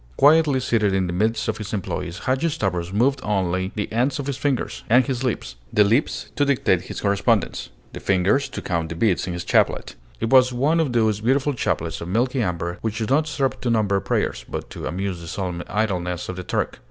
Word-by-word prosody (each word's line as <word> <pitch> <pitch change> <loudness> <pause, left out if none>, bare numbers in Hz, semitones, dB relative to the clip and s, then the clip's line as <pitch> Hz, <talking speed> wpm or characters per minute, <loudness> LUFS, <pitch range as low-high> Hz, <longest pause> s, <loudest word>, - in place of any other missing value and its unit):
Quietly 145 -1 +5
seated 105 -5 +1
in 95 -1 +1
the 85 - -3
midst 110 +4 0
of 110 - -2
his 105 0 -6
employees, 90 -2 -4
Hadgi 135 +6 +1
Stavros 95 - -2
moved 130 +7 +2
only 95 -3 -1
the 105 - -2
ends 125 +4 +1
of 140 - -4
his 140 -1 -2
fingers 140 -1 -2
and 125 +3 +5
his 130 -2 -2
lips; 110 - -3
the 105 - +5
lips 115 +9 0
to 145 - +2
dictate 130 -10 +2
his - - -6
correspondence, 100 -1 +1 0.2
the - - -6
fingers 95 +9 +2
to - - -6
count 85 -3 -1
the 85 - -5
beads 90 0 +1
in 90 - -3
his 85 -1 -4
chaplet. - - +1 0.3
It 115 - -2
was 130 -1 +6
one 140 +7 +2
of 150 -6 0
those 110 -3 +2
beautiful 135 +5 +2
chaplets 85 -9 -2
of 85 - -5
milky 125 +7 +1
amber 85 -2 -2
which 110 -1 -2
do 110 - -1
not 150 +6 +2
serve 140 -3 -1
to 125 - -1
number 105 -4 +2
prayers, - - -1
but - - -5
to - - -5
amuse 90 +2 -3
the 85 - -9
solemn 90 -1 -3
idleness 90 -5 -2
of 95 - -4
the 90 - -6
Turk. - - -2
110 Hz, 215 wpm, -23 LUFS, 90-130 Hz, 0.3 s, was